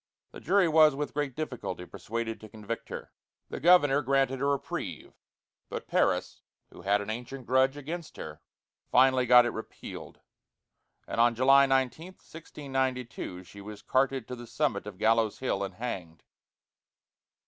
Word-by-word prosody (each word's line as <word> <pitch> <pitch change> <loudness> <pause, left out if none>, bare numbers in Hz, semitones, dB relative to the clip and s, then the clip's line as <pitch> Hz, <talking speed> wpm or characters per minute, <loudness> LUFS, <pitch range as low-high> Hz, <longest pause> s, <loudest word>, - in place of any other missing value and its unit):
The - - -10
jury 190 0 +3
was 155 -2 +6
with 145 +1 -4
great 145 -3 -2
difficulty 125 - -5
persuaded 115 +4 -5
to 110 - -11
convict 110 +1 -6
her; - - -7 0.4
the - - -4
governor 145 -3 +5
granted 135 -1 +1
a - - +1
reprieve, 140 -1 -3 0.6
but - - -6
Parris, - - 0 0.3
who - - -12
had 100 +3 +2
an 100 +1 -4
ancient 125 +3 -7
grudge 130 +3 +3
against 160 +3 -7
her, 75 -1 -8 0.5
finally 130 0 +4
got 125 0 +8
it 120 - -1
repealed, 110 - -9 0.9
and 115 - 0
on 120 0 +4
July 135 +3 +6
19, 135 +7 0
1692, 130 - -4
she 100 +2 -13
was 105 0 -10
carted 130 -2 +1
to 125 - -5
the 120 -1 -10
summit 120 -5 -1
of 100 -3 -8
Gallows 110 0 +2
Hill 110 -6 -1
and 100 - -5
hanged. 90 -9 -6
125 Hz, 150 wpm, -29 LUFS, 110-140 Hz, 0.9 s, got